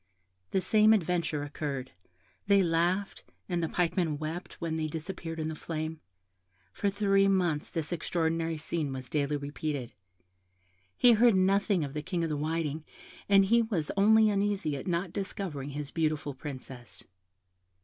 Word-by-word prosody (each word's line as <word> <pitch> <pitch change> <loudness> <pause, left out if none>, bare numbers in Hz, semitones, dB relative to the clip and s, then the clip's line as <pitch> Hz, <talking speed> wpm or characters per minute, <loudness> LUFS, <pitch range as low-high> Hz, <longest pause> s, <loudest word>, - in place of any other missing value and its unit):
The 190 - +1
same 215 +2 +5
adventure 170 -6 0
occurred 145 -3 -4 0.6
they 200 -1 +5
laughed, 175 +4 0 0.2
and 175 -2 -1
the 165 - 0
man - - -11
pike 170 -3 +1
wept 160 +3 -5
when 165 -1 -3
they 160 -1 -1
disappeared 165 +1 -5
in 155 - -1
the 160 - -3
flame. 155 0 -4 0.7
For 200 - 0
three 195 -1 +3
months 175 -6 +1
this 165 -1 -2
extraordinary 165 -1 -1
scene 155 -1 -2
was 130 -1 -7
daily 145 -1 0
repeated; 145 -2 -4 1.0
he 245 - +7
heard 230 -1 +5
nothing 195 -1 +2
of 140 -1 -5
the 150 - -3
King 175 +1 -2
of 165 - -1
the - - 0
Whiting, 155 0 -2 0.5
and 195 -1 +6
he 235 +4 +4
was 195 -10 -1
only 215 +2 +5
uneasy 200 -6 0
at 135 - -6
not 175 0 -1
discovering 190 -8 -4
his 145 0 -5
beautiful 155 -3 -1
Princess. 130 -3 -9
165 Hz, 155 wpm, -30 LUFS, 150-195 Hz, 1.0 s, he